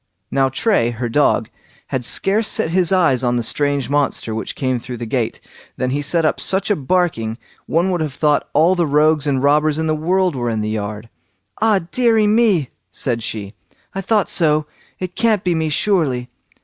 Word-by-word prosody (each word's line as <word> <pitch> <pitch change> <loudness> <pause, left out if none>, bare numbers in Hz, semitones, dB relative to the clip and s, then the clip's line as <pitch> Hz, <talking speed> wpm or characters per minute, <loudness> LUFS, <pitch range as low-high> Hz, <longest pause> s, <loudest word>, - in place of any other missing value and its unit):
Now, 135 -1 +2
Tray, 135 - +1
her 120 +1 -4
dog, 145 +5 +2 0.4
had 130 - -2
scarce 205 - +1
set 165 - 0
his 180 -1 +2
eyes 165 -9 +3
on 120 0 +1
the 120 - 0
strange 140 +1 -1
monster 140 -5 -1
which 110 - -4
came 130 -2 -1
through 125 +1 -7
the 120 - -5
gate, 115 0 -2 0.4
than 130 0 -1
he 145 +2 -1
set 165 +3 +1
up - - +1
such 190 +2 +1
a - - +3
barking, 140 -8 -1 0.3
one 175 +4 +1
would 175 -2 -1
have 150 -4 -3
thought 150 0 +1
all 165 +4 +4
the 175 -3 0
rogues 150 0 +2
and 135 -2 0
robbers 150 +1 +3
in 160 - -1
the 155 - +1
world 180 +2 0
were 120 -2 -2
in 110 -2 -1
the 105 - -2
yard. 105 +1 -4 0.5
"Ah, 215 -3 +3
deary 230 -4 +3
me", 210 - +2 0.2
said 120 -3 -2
she, 105 -2 -5 0.4
"I 195 - -3
thought 205 +1 +1
so; 155 -2 +2 0.3
it 180 -1 -6
can't 220 -4 +2
be 180 - +1
me 160 -1 -1
surely." 145 -8 0
150 Hz, 195 wpm, -19 LUFS, 125-185 Hz, 0.5 s, all